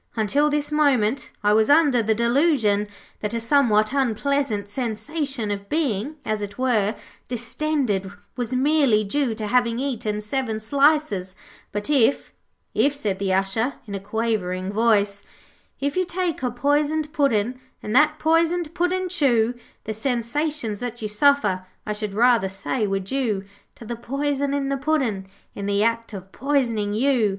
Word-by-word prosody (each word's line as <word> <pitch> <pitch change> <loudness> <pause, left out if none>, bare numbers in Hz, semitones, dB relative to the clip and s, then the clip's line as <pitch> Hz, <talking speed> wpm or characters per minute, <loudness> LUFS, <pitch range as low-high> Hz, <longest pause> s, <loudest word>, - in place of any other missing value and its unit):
'Until 275 +7 +2
this 295 0 -1
moment 275 -6 +2
I 210 0 +4
was 220 +3 +3
under 290 -5 +5
the 220 0 +1
delusion 235 -4 +2 0.3
that 210 +2 -3
a - - 0
somewhat 230 -3 +3
unpleasant 265 -4 0
sensation 250 +2 -3
of 200 0 -5
being, 290 -3 -1
as 215 -1 -1
it 200 0 -6
were, 225 -5 +1 0.3
distended, 245 -4 -1 0.2
was 245 0 -2
merely 270 -5 +3
due 235 +3 0
to 215 -1 -4
having 235 +1 +2
eaten 230 -6 -2
seven 220 +1 -2
slices. 275 -6 +1 0.4
But 205 0 -3
if 275 -2 +2 0.2
' - - -49
'If,' 285 +1 +2
said 205 -8 -2
the 195 -1 -1
Usher, 195 +7 +1
in 205 - -8
a 195 - -3
quavering 200 -3 -2
voice 205 -2 +2 0.6
'If 280 +1 -1
you 370 - +2
take 355 -4 -2
a 250 - 0
poisoned 295 +4 0
Puddin' 250 -3 +1 0.2
And 210 - -3
that 300 +2 +5
poisoned 330 +1 +1
Puddin' 365 +1 0
chew 250 -10 +2 0.3
The 220 - -4
sensations 240 0 -2
that 240 -2 -5
you - - -1
suffer 210 -5 +2 0.2
I 210 - -2
should 210 -1 -4
rather 235 -3 +4
say 200 +4 -2
were 195 0 0
due 205 0 -2 0.3
To 230 - -12
the 235 - -4
poison 280 +3 -1
in 275 -1 -1
the 275 - 0
Puddin' 265 -10 -1 0.3
In 200 0 -5
the 200 +1 +2
act 230 0 0
of 195 -2 -9
Poisoning 235 -7 0
You. 245 -2 +2
235 Hz, 160 wpm, -23 LUFS, 210-285 Hz, 0.6 s, under